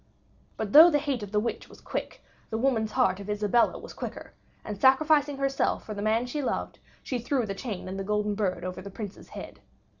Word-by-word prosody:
But 215 -2 -4
though 320 +4 +11
the 295 - +3
hate 280 -5 -2
of 205 -1 -7
the 210 - +2
witch 235 +3 -3
was - - -15
quick, - - -5 0.3
the 220 - -2
woman's 225 -3 +1
heart 250 -7 +2
of 200 +1 -8
Isabella 210 +3 +2
was - - -10
quicker, - - -7 0.3
and 210 - -4
sacrificing 290 +1 +4
herself 275 0 0
for 215 - -5
the 205 - -5
man 220 +3 +1
she 290 +4 -3
loved, 265 - -3 0.2
she 255 - -2
threw 245 +1 0
the 195 - -3
chain 200 -3 -5
and 190 +1 -5
the - - -2
golden 210 +1 0
bird 190 -4 -1
over 185 0 -5
the 200 - -8
Prince's 205 0 -8
head. - - -9
220 Hz, 215 wpm, -28 LUFS, 205-265 Hz, 0.3 s, though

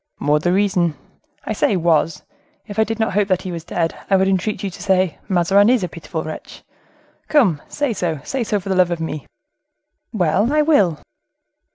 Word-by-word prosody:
"More 150 +1 +2
the 175 +3 0
reason—I 180 -1 -2
say 205 -1 +1
was; 165 -2 +1 0.4
if 210 0 -6
I - - +6
did 225 +1 -4
not 220 -3 0
hope 205 0 +2
that 185 -2 0
he 185 - -5
was 165 -2 -6
dead, 165 -1 -1 0.2
I 195 - +4
would 190 0 +3
entreat 195 +3 -1
you 195 - -2
to - - -11
say: 185 -3 +1
'Mazarin 195 +3 +4
is 245 -5 +3
a - - 0
pitiful 165 -1 -6
wretch.' 155 - -9 0.6
Come, 200 - +3
say 290 -5 -1
so, 170 -6 -2
say 270 -2 -2
so, 210 -2 -1
for 195 0 -3
love 185 -1 +3
of 175 -1 -2
me." 155 -3 -5 0.8
"Well, 195 - +1
I 300 0 +3
will." 200 - +3
185 Hz, 190 wpm, -20 LUFS, 170-210 Hz, 0.8 s, I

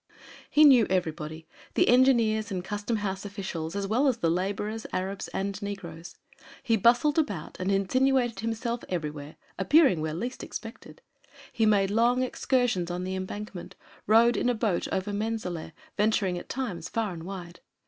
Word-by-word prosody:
He 300 - +5
knew 255 -7 +7
everybody 160 -3 -2 0.3
the - - +4
engineers 230 -4 +4
and 185 -3 -3
custom 205 +3 -3
house 195 -2 -3
officials 190 -5 -5
as 200 0 -1
well 240 +8 +2
as 255 -4 +2
the 165 -8 +1
laborers, 205 +5 -2
Arabs 190 +1 -3
and 195 +1 -3
negroes. 175 -5 -7 0.5
He 235 -4 +2
bustled 245 - +4
about 205 - -3
and 185 +2 0
insinuated 240 +3 +2
himself 230 +2 -3
everywhere, 150 -4 -4 0.2
appearing 195 - +4
where 155 0 -2
least 240 +9 -4
expected; - - -9 0.5
he 220 -1 +2
made 200 -2 +3
long 240 +4 +3
excursions 245 -8 0
on 175 +1 -3
the 185 +1 -3
embankment, 190 0 -6 0.3
rowed 230 +3 +5
in - - +1
a 245 - +1
boat 215 -5 0
over 190 +2 -2
Menzaleh, 205 -7 -3 0.3
venturing 205 -3 +2
at 175 - -7
times 185 -10 -4
far 220 -4 -2
and 165 - -8
wide. 175 -1 -8
205 Hz, 160 wpm, -27 LUFS, 180-230 Hz, 0.5 s, knew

